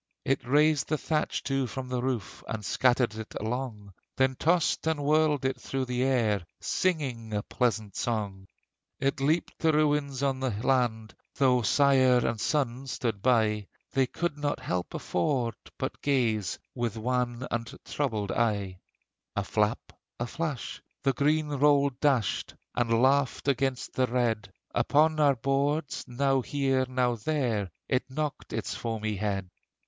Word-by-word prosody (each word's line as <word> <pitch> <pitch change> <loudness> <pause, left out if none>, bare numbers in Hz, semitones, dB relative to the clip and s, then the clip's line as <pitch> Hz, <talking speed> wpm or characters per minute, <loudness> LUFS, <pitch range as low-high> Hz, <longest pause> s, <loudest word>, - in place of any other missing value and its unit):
It 135 - +1
raised 150 +2 +4
the 155 - +1
thatch 155 +1 -1
too 135 -2 0
from 130 +2 -6
the 125 -1 -1
roof, 125 -4 -3
And 105 -2 -4
scattered 125 -1 +2
it 110 0 -8
along; 110 -3 -4 0.2
Then 130 0 +3
tossed 160 +3 +1
and 155 -3 0
whirled 150 -2 +3
it 130 0 -1
through 135 -1 -2
the 125 0 -2
air, 115 -7 +2 0.2
Singing 130 - -1
a 105 - -1
pleasant 110 -5 -1
song. 100 -5 -2 0.5
It 135 +1 0
heaped 155 +5 0
the 160 -1 +3
ruins 145 -3 +1
on 135 -1 +1
the 130 0 0 0.2
land: 120 -5 +1 0.2
Though 130 -2 +4
sire 130 0 +4
and 115 -2 -1
son 135 -3 0
stood 115 -5 -2
by, 110 -4 +2 0.3
They 135 -1 +3
could 160 +1 -3
no 145 0 0
help 90 -1 -3
afford, 120 - 0 0.2
but 130 - -4
gaze 115 -8 +1 0.2
With 120 -3 -2
wan 125 +1 -1
and 115 0 -2
troubled 110 -9 -1
eye! 100 -5 0 0.6
A - - 0
flap, - - 0 0.3
a 120 - -1
flash, 145 0 -4 0.2
the 135 -1 +3
green 150 +4 +2
roll 145 -1 +3
dashed, 125 - 0 0.2
And 115 0 +2
laughed 135 +1 +2
against 135 -1 0
the 130 -1 +2
red; 115 -5 0 0.2
Upon 155 +2 +3
our 145 -2 +5
boards, 140 +4 0
now 135 +1 +1
here, 135 -1 0
now 125 -2 +1
there, 115 -6 -1 0.2
It 130 0 0
knocked 150 +2 -4
its - - -3
foamy 110 -2 -3
head. 100 -2 -2
130 Hz, 150 wpm, -28 LUFS, 115-140 Hz, 0.6 s, our